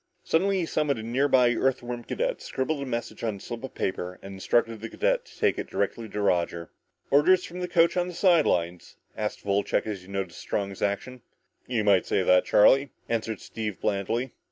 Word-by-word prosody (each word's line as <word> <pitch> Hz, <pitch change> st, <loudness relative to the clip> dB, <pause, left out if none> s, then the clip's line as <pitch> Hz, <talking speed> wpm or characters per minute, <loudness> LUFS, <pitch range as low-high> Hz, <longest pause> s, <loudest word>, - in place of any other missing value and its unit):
Suddenly 190 Hz, +3 st, +2 dB
he -, -, -1 dB
summoned 150 Hz, -4 st, 0 dB
a 110 Hz, -, -6 dB
near 125 Hz, +5 st, +1 dB
by 125 Hz, -3 st, +4 dB
Earthworm 120 Hz, -1 st, -1 dB
cadet, -, -, -2 dB
scribbled 140 Hz, +2 st, -2 dB
a 140 Hz, -, -4 dB
message 120 Hz, -2 st, -4 dB
on 110 Hz, -3 st, -1 dB
a -, -, -10 dB
slip 115 Hz, +4 st, -7 dB
of 130 Hz, -, -7 dB
paper 90 Hz, -1 st, -3 dB
and 95 Hz, 0 st, -8 dB
instructed 115 Hz, +3 st, 0 dB
the 115 Hz, -, -5 dB
cadet -, -, 0 dB
to -, -, -17 dB
take -, -, +1 dB
it -, -, -5 dB
directly 115 Hz, -2 st, -2 dB
to 105 Hz, -, -3 dB
Roger. 85 Hz, -3 st, 0 dB, 0.4 s
"Orders 180 Hz, +6 st, +5 dB
from 180 Hz, +2 st, -7 dB
the 180 Hz, -, -2 dB
coach 170 Hz, -1 st, +3 dB
on 180 Hz, -1 st, +1 dB
the 180 Hz, -, -7 dB
side 175 Hz, -5 st, +4 dB
lines?" 85 Hz, 0 st, -1 dB, 0.2 s
asked 105 Hz, -1 st, -4 dB
Wolcheck 100 Hz, 0 st, +1 dB
as 105 Hz, -3 st, -4 dB
he 90 Hz, -, -16 dB
noticed 95 Hz, -4 st, -4 dB
Strong's 100 Hz, -1 st, -3 dB
action. 110 Hz, +5 st, -2 dB, 0.5 s
"You 120 Hz, -4 st, 0 dB
might 100 Hz, -3 st, +3 dB
call -, -, +1 dB
it 95 Hz, -, +2 dB
that, 90 Hz, 0 st, +4 dB
Charlie," 135 Hz, +6 st, +5 dB, 0.2 s
answered 110 Hz, -3 st, -2 dB
Steve 105 Hz, -3 st, -5 dB
blandly. 110 Hz, +5 st, -1 dB
115 Hz, 205 wpm, -27 LUFS, 100-145 Hz, 0.5 s, Orders